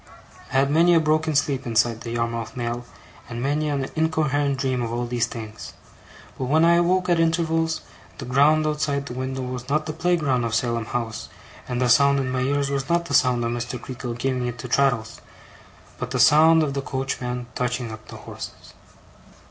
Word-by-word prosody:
I -, -, -5 dB
had 135 Hz, +1 st, +3 dB
many 170 Hz, +3 st, +5 dB
a -, -, +6 dB
broken 155 Hz, 0 st, +1 dB
sleep 140 Hz, -3 st, 0 dB
inside 115 Hz, 0 st, +1 dB
the 115 Hz, -, -6 dB
Yarmouth 115 Hz, 0 st, -3 dB
mail, 120 Hz, 0 st, -3 dB, 0.4 s
and 120 Hz, -1 st, -5 dB
many 145 Hz, +4 st, 0 dB
an 140 Hz, -2 st, -1 dB
incoherent 150 Hz, -3 st, +1 dB
dream 130 Hz, -1 st, -1 dB
of 115 Hz, -1 st, -3 dB
all 120 Hz, +1 st, -2 dB
these 120 Hz, -1 st, 0 dB
things. 110 Hz, -2 st, -8 dB, 0.7 s
But 130 Hz, -, -1 dB
when 155 Hz, +5 st, +3 dB
I 170 Hz, 0 st, +5 dB
awoke 180 Hz, +1 st, +2 dB
at 175 Hz, -2 st, +2 dB
intervals, 165 Hz, -1 st, +1 dB, 0.4 s
the -, -, -7 dB
ground 145 Hz, +5 st, +4 dB
outside 145 Hz, -2 st, -1 dB
the 125 Hz, -, -6 dB
window 130 Hz, +1 st, -4 dB
was 125 Hz, 0 st, -6 dB
not 155 Hz, +2 st, +1 dB
the 155 Hz, -, -4 dB
playground 160 Hz, -7 st, +1 dB
of 115 Hz, -1 st, -1 dB
Salem 115 Hz, -1 st, 0 dB
House, 115 Hz, -1 st, -4 dB, 0.4 s
and 125 Hz, -1 st, -2 dB
the 125 Hz, -, +2 dB
sound 140 Hz, +3 st, +5 dB
in 130 Hz, -1 st, -2 dB
my 130 Hz, 0 st, -1 dB
ears 140 Hz, +1 st, 0 dB
was 135 Hz, -1 st, -2 dB
not 170 Hz, 0 st, +2 dB
the 140 Hz, -, -5 dB
sound 125 Hz, -3 st, +3 dB
of 115 Hz, -, -1 dB
Mr. 120 Hz, +1 st, -4 dB
Creakle 125 Hz, -1 st, -6 dB
giving 125 Hz, -1 st, -1 dB
it 120 Hz, 0 st, -5 dB
to 125 Hz, -, -7 dB
Traddles, 125 Hz, -3 st, +1 dB, 0.8 s
but -, -, -4 dB
the -, -, -2 dB
sound 160 Hz, +2 st, +6 dB
of 140 Hz, -3 st, -1 dB
the 140 Hz, -, -2 dB
coachman 125 Hz, -2 st, -3 dB
touching 125 Hz, -1 st, -2 dB
up 110 Hz, 0 st, -10 dB
the -, -, -9 dB
horses. -, -, -10 dB
135 Hz, 195 wpm, -23 LUFS, 120-155 Hz, 0.8 s, a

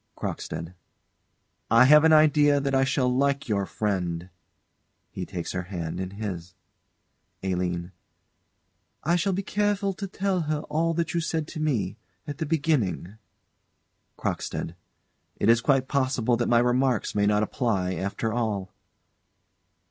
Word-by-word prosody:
CROCKSTEAD. 80 Hz, +3 st, -5 dB, 1.0 s
I 115 Hz, +3 st, +7 dB
have 150 Hz, +3 st, +7 dB
an 160 Hz, -, +5 dB
idea 150 Hz, -2 st, +5 dB
that 140 Hz, 0 st, -2 dB
I 135 Hz, 0 st, +4 dB
shall 130 Hz, -1 st, +1 dB
like 140 Hz, +3 st, +1 dB
your 100 Hz, -3 st, 0 dB
friend. 90 Hz, -4 st, -2 dB, 0.8 s
[He 90 Hz, -, -5 dB
takes 85 Hz, -2 st, -5 dB
her 95 Hz, -, -2 dB
hand 85 Hz, -4 st, -4 dB
in 95 Hz, -1 st, -3 dB
his.] 90 Hz, -5 st, -5 dB, 0.9 s
ALINE. 90 Hz, -2 st, -2 dB, 1.1 s
I 170 Hz, +3 st, +2 dB
shall 190 Hz, +3 st, +1 dB
be 195 Hz, +2 st, -2 dB
careful 205 Hz, -1 st, 0 dB
to 195 Hz, +1 st, -5 dB
tell 190 Hz, -1 st, -1 dB
her 150 Hz, -1 st, 0 dB
all 160 Hz, +2 st, -1 dB
that 170 Hz, 0 st, -1 dB
you 170 Hz, -, +1 dB
said 160 Hz, -1 st, -2 dB
to -, -, -7 dB
me 120 Hz, -12 st, -1 dB, 0.3 s
at 145 Hz, 0 st, -6 dB
the 160 Hz, -, -2 dB
beginning 140 Hz, -, 0 dB, 1.0 s
CROCKSTEAD. 80 Hz, -, -3 dB, 0.6 s
It 105 Hz, -, +1 dB
is 115 Hz, 0 st, +5 dB
quite 135 Hz, 0 st, +2 dB
possible 130 Hz, -4 st, +1 dB
that 120 Hz, 0 st, -1 dB
my 120 Hz, -, +5 dB
remarks 125 Hz, 0 st, +2 dB
may 100 Hz, 0 st, +2 dB
not 105 Hz, 0 st, +3 dB
apply 105 Hz, -6 st, -1 dB
after 100 Hz, +5 st, -2 dB
all. 105 Hz, -6 st, -2 dB
125 Hz, 140 wpm, -26 LUFS, 95-150 Hz, 1.1 s, I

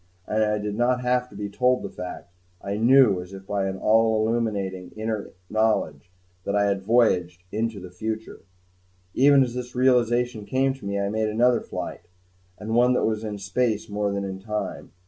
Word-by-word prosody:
And 110 Hz, +3 st, +1 dB
I 105 Hz, 0 st, +1 dB
did 105 Hz, 0 st, -3 dB
not 125 Hz, +3 st, +1 dB
have 125 Hz, 0 st, 0 dB
to 105 Hz, -, -15 dB
be 100 Hz, 0 st, -4 dB
told 125 Hz, +5 st, +1 dB
the -, -, -4 dB
fact; 90 Hz, -1 st, -8 dB, 0.3 s
I 100 Hz, 0 st, -4 dB
knew, 115 Hz, -4 st, +5 dB
as 90 Hz, +2 st, -10 dB
by 100 Hz, -1 st, -1 dB
an 95 Hz, 0 st, -3 dB
all 110 Hz, +1 st, +3 dB
illuminating 100 Hz, -6 st, -2 dB
inner 110 Hz, -1 st, -3 dB, 0.2 s
knowledge, 105 Hz, -9 st, 0 dB, 0.3 s
that 100 Hz, -, -2 dB
I 100 Hz, 0 st, +3 dB
had 100 Hz, -1 st, 0 dB
voyaged 90 Hz, -5 st, +2 dB
into 110 Hz, -1 st, -2 dB
the 90 Hz, -1 st, -10 dB
future. 110 Hz, +4 st, -5 dB, 0.7 s
Even 140 Hz, +1 st, +6 dB
as 120 Hz, -2 st, -4 dB
this 125 Hz, 0 st, -6 dB
realization 125 Hz, -2 st, +2 dB
came 135 Hz, +1 st, +1 dB
to 135 Hz, -6 st, -12 dB
me, 100 Hz, 0 st, -1 dB
I 100 Hz, 0 st, -1 dB
made 110 Hz, +1 st, 0 dB
another 120 Hz, +2 st, +3 dB
flight 85 Hz, -, -6 dB, 0.5 s
and 110 Hz, +1 st, -5 dB
one 125 Hz, +2 st, +4 dB
that -, -, +1 dB
was 110 Hz, 0 st, -1 dB
in 105 Hz, -2 st, -4 dB
space 105 Hz, +3 st, -1 dB
more 105 Hz, 0 st, -1 dB
than 100 Hz, 0 st, -2 dB
in 95 Hz, -1 st, -5 dB
time. 105 Hz, +1 st, -5 dB
110 Hz, 185 wpm, -25 LUFS, 100-120 Hz, 0.7 s, Even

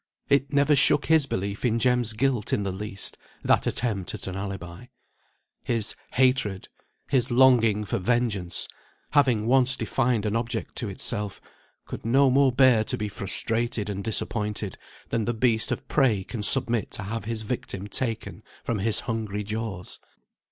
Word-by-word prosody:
It 140 Hz, 0 st, +2 dB
never 145 Hz, +1 st, +4 dB
shook 140 Hz, +1 st, +4 dB
his 160 Hz, -3 st, +4 dB
belief 100 Hz, -2 st, -3 dB
in 115 Hz, -2 st, +2 dB
Jem's 120 Hz, -1 st, +1 dB
guilt 120 Hz, -1 st, 0 dB
in 105 Hz, -, +1 dB
the 100 Hz, -, -2 dB
least, 95 Hz, +1 st, -5 dB, 0.2 s
that -, -, +3 dB
attempt 105 Hz, -7 st, -1 dB
at -, -, -7 dB
an 95 Hz, -, -5 dB
alibi; 95 Hz, +1 st, -6 dB, 0.8 s
his 115 Hz, -3 st, -1 dB, 0.2 s
hatred, 125 Hz, -7 st, +1 dB, 0.4 s
his 130 Hz, -3 st, +1 dB
longing 120 Hz, -4 st, +4 dB
for -, -, -2 dB
vengeance, 105 Hz, -4 st, 0 dB, 0.4 s
having 130 Hz, -7 st, +3 dB
once 130 Hz, +1 st, +3 dB
defined 120 Hz, -5 st, 0 dB
an 105 Hz, +1 st, 0 dB
object 115 Hz, 0 st, -3 dB
to 115 Hz, -, -2 dB
itself, 105 Hz, +1 st, -2 dB, 0.5 s
could -, -, -7 dB
no 130 Hz, +4 st, +4 dB
more 135 Hz, 0 st, +4 dB
bear 125 Hz, -3 st, +5 dB
to -, -, -1 dB
be 105 Hz, 0 st, -3 dB
frustrated 110 Hz, +2 st, -2 dB
and 100 Hz, 0 st, -5 dB
disappointed 105 Hz, -2 st, -2 dB, 0.3 s
than 115 Hz, -2 st, 0 dB
the 120 Hz, -, -1 dB
beast 115 Hz, -1 st, +1 dB
of -, -, -3 dB
prey 120 Hz, -9 st, +2 dB
can 110 Hz, +3 st, -6 dB
submit 120 Hz, 0 st, +2 dB
to -, -, -4 dB
have 110 Hz, +2 st, -4 dB
his 110 Hz, 0 st, -3 dB
victim 105 Hz, -3 st, -4 dB
taken 115 Hz, 0 st, -3 dB, 0.2 s
from 115 Hz, -3 st, -2 dB
his 110 Hz, +2 st, +2 dB
hungry 110 Hz, -3 st, -3 dB
jaws. 105 Hz, -3 st, -5 dB
115 Hz, 160 wpm, -26 LUFS, 105-125 Hz, 0.8 s, bear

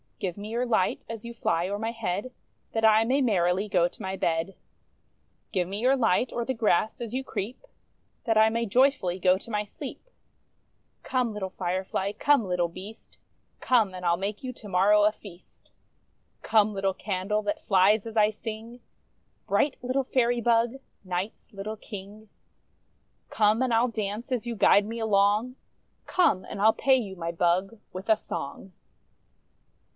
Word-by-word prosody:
Give 180 Hz, -3 st, -3 dB
me 205 Hz, +1 st, -7 dB
your 240 Hz, +2 st, -1 dB
light, 220 Hz, -6 st, +1 dB
as 230 Hz, -1 st, -7 dB
you 235 Hz, -, -6 dB
fly 175 Hz, -6 st, 0 dB
o'er 200 Hz, +1 st, -3 dB
my 225 Hz, +1 st, -2 dB
head, 225 Hz, +1 st, -3 dB, 0.4 s
That 225 Hz, 0 st, +1 dB
I 220 Hz, 0 st, +6 dB
may 260 Hz, +5 st, +1 dB
merrily 190 Hz, -4 st, +1 dB
go 180 Hz, -3 st, +3 dB
to -, -, -14 dB
my 190 Hz, 0 st, -3 dB
bed. 165 Hz, +1 st, -1 dB, 1.0 s
Give 180 Hz, -3 st, 0 dB
me 200 Hz, +2 st, -4 dB
your 255 Hz, +4 st, +3 dB
light, 235 Hz, -1 st, +2 dB
o'er 235 Hz, 0 st, -2 dB
the 260 Hz, -, -1 dB
grass 220 Hz, 0 st, +1 dB
as 230 Hz, -2 st, -5 dB
you 265 Hz, +1 st, -2 dB
creep, 225 Hz, -, -5 dB, 0.6 s
That 225 Hz, -3 st, +2 dB
I 220 Hz, 0 st, +6 dB
may 230 Hz, +1 st, -1 dB
joyfully 220 Hz, -6 st, +2 dB
go 185 Hz, 0 st, +4 dB
to 230 Hz, -, -12 dB
my 210 Hz, -1 st, 0 dB
sleep. 210 Hz, -, -9 dB, 0.9 s
Come, 250 Hz, -4 st, -1 dB
little 195 Hz, -2 st, -4 dB
Firefly, 190 Hz, +2 st, -2 dB
come, 280 Hz, +1 st, +3 dB
little 180 Hz, -1 st, +1 dB
beast 190 Hz, +6 st, -12 dB, 0.2 s
— -, -, -44 dB
Come! 220 Hz, -7 st, +2 dB
and 180 Hz, 0 st, -7 dB
I'll 170 Hz, 0 st, +3 dB
make 200 Hz, +5 st, -4 dB
you 255 Hz, -1 st, -4 dB
to 220 Hz, -, -11 dB
morrow 200 Hz, +2 st, +4 dB
a 210 Hz, -, +5 dB
feast. 190 Hz, -4 st, -15 dB, 0.7 s
Come, 215 Hz, -1 st, +3 dB
little 195 Hz, -1 st, -1 dB
candle, 205 Hz, +1 st, -2 dB
that 205 Hz, 0 st, -3 dB
flies 200 Hz, +3 st, +3 dB
as 225 Hz, 0 st, -6 dB
I 210 Hz, -1 st, +5 dB
sing, 225 Hz, +2 st, -7 dB, 0.7 s
Bright 280 Hz, -, +2 dB
little 255 Hz, +2 st, 0 dB
Fairy 245 Hz, -2 st, +1 dB
bug, 235 Hz, +1 st, +2 dB, 0.3 s
Night's 185 Hz, +3 st, -5 dB
little 210 Hz, +2 st, -6 dB
King; 210 Hz, +1 st, -10 dB, 1.0 s
Come, 215 Hz, +2 st, +2 dB
and 255 Hz, -2 st, +1 dB
I 225 Hz, +1 st, +4 dB
'II 250 Hz, -, 0 dB
dance 215 Hz, +2 st, -4 dB
as 245 Hz, -2 st, -1 dB
you 235 Hz, -, -3 dB
guide 205 Hz, 0 st, +5 dB
me 230 Hz, +2 st, -5 dB
along, 210 Hz, +3 st, +2 dB, 0.5 s
Come, 290 Hz, -, +2 dB
and 200 Hz, -, -7 dB
I'll 220 Hz, +2 st, +5 dB
pay 270 Hz, -2 st, +3 dB
you, 210 Hz, -7 st, -3 dB
my 170 Hz, -2 st, -4 dB
bug, 180 Hz, +5 st, 0 dB
with 185 Hz, +4 st, -7 dB
a 220 Hz, -, +5 dB
song! 185 Hz, +5 st, -7 dB
210 Hz, 175 wpm, -27 LUFS, 190-230 Hz, 1.0 s, I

